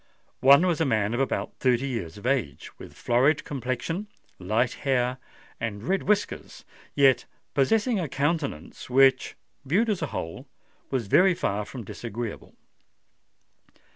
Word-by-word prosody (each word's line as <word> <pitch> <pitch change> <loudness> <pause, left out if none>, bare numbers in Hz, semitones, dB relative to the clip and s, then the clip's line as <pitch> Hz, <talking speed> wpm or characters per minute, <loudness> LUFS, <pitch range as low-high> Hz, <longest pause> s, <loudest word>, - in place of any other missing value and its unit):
One 140 +6 +7
was 170 -3 +1
a - - +3
man 110 -3 +1
of 120 - -1
about 135 - -1
thirty 130 +1 +2
years 100 -11 -4
of 105 - -11
age, 120 - -1
with - - -11
florid 130 +6 +2
complexion, 135 - -3 0.3
light 110 +6 0
hair, 130 -2 0 0.4
and 110 -3 -4
red 190 +8 0
whiskers,—yet 145 -8 0 0.3
possessing 215 - +2
a 165 -5 -3
countenance 140 - -3
which, 135 +1 +4 0.3
viewed 200 - +1
as 195 - -2
a 160 - -1
whole, 80 -9 -6 0.4
was 130 -4 -1
very 185 - +4
far 105 -8 -2
from 120 +3 -8
disagreeable. 115 +1 -7
130 Hz, 135 wpm, -26 LUFS, 115-155 Hz, 0.4 s, One